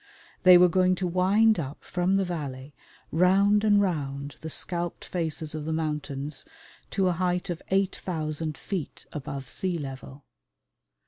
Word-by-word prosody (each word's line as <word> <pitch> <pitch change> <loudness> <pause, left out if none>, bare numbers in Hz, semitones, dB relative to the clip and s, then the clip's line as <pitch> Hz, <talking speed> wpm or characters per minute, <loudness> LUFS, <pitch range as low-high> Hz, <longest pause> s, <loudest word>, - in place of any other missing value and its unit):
They 180 -1 +9
were 180 +1 +7
going 185 +1 +3
to 185 - -2
wind 190 +4 +3
up 140 -2 -6
from 180 +1 0
the 195 -1 +2
valley 145 -5 -5 0.4
round 195 +5 +4
and 205 -1 +5
round 145 -7 -2
the 160 - -5
scalped 175 +1 -2
faces 160 -3 -3
of 155 -1 -5
the 160 - -2
mountains 150 -2 -2 0.5
to 195 -2 +1
a - - +3
height 180 +1 -1
of 170 - -5
8,000 160 -5 -1
feet 185 -7 -5
above 135 -2 -5
sea 185 +4 -2
level. 135 -1 -8
170 Hz, 145 wpm, -27 LUFS, 150-185 Hz, 0.5 s, They